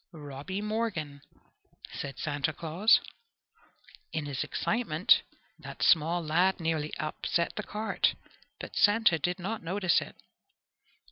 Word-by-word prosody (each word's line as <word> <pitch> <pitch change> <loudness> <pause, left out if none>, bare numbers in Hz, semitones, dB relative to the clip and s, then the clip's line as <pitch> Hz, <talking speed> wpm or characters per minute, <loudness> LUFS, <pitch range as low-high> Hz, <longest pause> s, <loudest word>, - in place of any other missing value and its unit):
"Robby 150 +5 -6
Morgan!" 210 -10 -3 0.7
said 140 -2 -6
Santa 145 +1 -1
Claus. 170 +8 +3 1.1
In 155 -2 -3
his 140 -3 -2
excitement 200 -8 +2 0.4
that - - -7
small 170 +1 +4
lad 180 +5 +2
nearly 160 -2 -1
upset 165 +2 -1
the - - -2
cart, 215 +1 0 0.4
but - - -8
Santa 205 -5 +4
did 180 +4 -1
not 200 +5 -4
notice 185 +2 +1
it. - - -9
170 Hz, 115 wpm, -29 LUFS, 155-200 Hz, 1.1 s, small